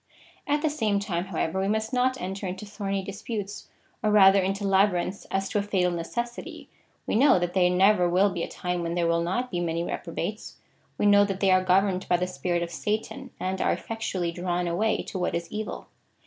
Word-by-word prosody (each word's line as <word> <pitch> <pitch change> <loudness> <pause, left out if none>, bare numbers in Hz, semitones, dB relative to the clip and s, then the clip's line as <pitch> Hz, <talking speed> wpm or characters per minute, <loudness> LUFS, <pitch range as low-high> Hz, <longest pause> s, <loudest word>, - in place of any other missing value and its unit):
At 295 +1 +1
the 310 - +3
same 215 -8 0
time, 185 -3 -2
however, 190 -1 -2
we 195 - 0
must 220 +3 -1
not 255 +1 +1
enter 190 +2 -4
into 185 +3 -5
thorny 200 -1 -3
disputes, 205 +1 -6 0.3
or 215 - +1
rather 195 -2 +6
into 195 +2 -1
labyrinths 195 -1 +1
as 195 0 -1
to 205 - 0
a - - +1
fatal 190 -3 +1
necessity. 235 +8 -5 0.4
We - - -2
know 260 0 +5
that 175 0 -1
there 180 -2 +4
never 180 0 +4
will 190 +3 +3
be 175 -2 -4
a - - -2
time 180 -1 -3
when 170 0 -2
there 175 -1 +1
will 170 0 +2
not 245 +9 -2
be 175 - -1
many 170 -1 -1
reprobates. - - -5 0.4
We - - 0
know 205 0 +6
that 195 -1 -3
they 195 -1 +3
are 185 0 +4
governed 185 0 +2
by 175 - +4
the 180 - 0
spirit 180 -1 -2
of 170 - -6
Satan, 220 +8 -3
and 190 0 -2
are - - +2
eifec 225 0 -7
tually 180 -6 -2
drawn 175 0 -2
away 210 +6 0
to 190 - -6
what 180 - -1
is 170 0 -3
evil. 215 0 -5
195 Hz, 215 wpm, -26 LUFS, 180-210 Hz, 0.4 s, rather